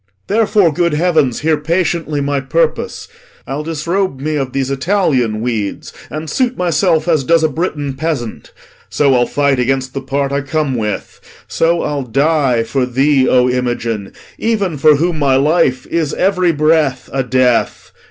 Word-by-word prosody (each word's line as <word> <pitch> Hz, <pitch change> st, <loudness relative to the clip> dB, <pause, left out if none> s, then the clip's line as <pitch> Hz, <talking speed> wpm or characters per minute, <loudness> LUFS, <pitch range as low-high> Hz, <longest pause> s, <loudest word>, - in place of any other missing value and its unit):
Therefore, 210 Hz, -5 st, +2 dB
good 170 Hz, +1 st, +1 dB
heavens, 155 Hz, -6 st, +1 dB
Hear 155 Hz, 0 st, +2 dB
patiently 160 Hz, -1 st, -1 dB
my 140 Hz, 0 st, 0 dB
purpose. 160 Hz, +4 st, -1 dB, 0.4 s
I'll 135 Hz, +3 st, -4 dB
disrobe 165 Hz, +1 st, -2 dB
me 155 Hz, +2 st, -2 dB
Of 135 Hz, -3 st, -2 dB
these 135 Hz, 0 st, -2 dB
Italian 135 Hz, -, 0 dB
weeds, 110 Hz, -4 st, -3 dB, 0.2 s
and 155 Hz, +1 st, -6 dB
suit 250 Hz, -, -1 dB
myself 170 Hz, -1 st, +1 dB
As 160 Hz, -5 st, +2 dB
does 165 Hz, +3 st, +3 dB
a -, -, +4 dB
Britain 150 Hz, -2 st, -3 dB
peasant. 135 Hz, -5 st, -4 dB, 0.4 s
So 140 Hz, -2 st, +2 dB
I'll 120 Hz, -1 st, +2 dB
fight 140 Hz, -2 st, +1 dB
Against 130 Hz, +1 st, -1 dB
the 135 Hz, -, -4 dB
part 140 Hz, +1 st, -2 dB
I 140 Hz, 0 st, 0 dB
come 145 Hz, 0 st, -1 dB
with; 105 Hz, -4 st, -4 dB, 0.3 s
so 170 Hz, +1 st, +1 dB
I'll 145 Hz, -1 st, -2 dB
die 135 Hz, -1 st, +1 dB
For 125 Hz, +2 st, -1 dB
thee, 135 Hz, +1 st, +2 dB
O 125 Hz, 0 st, +4 dB
Imogen, 120 Hz, -4 st, -2 dB, 0.3 s
even 205 Hz, -7 st, 0 dB
for 150 Hz, +1 st, +5 dB
whom 165 Hz, +2 st, -1 dB
my 140 Hz, -2 st, +3 dB
life 135 Hz, -2 st, +2 dB
Is 165 Hz, -4 st, -2 dB
every 185 Hz, -2 st, +2 dB
breath 155 Hz, -4 st, +1 dB
a 135 Hz, -, +1 dB
death. 125 Hz, -1 st, 0 dB
145 Hz, 160 wpm, -15 LUFS, 130-165 Hz, 0.4 s, for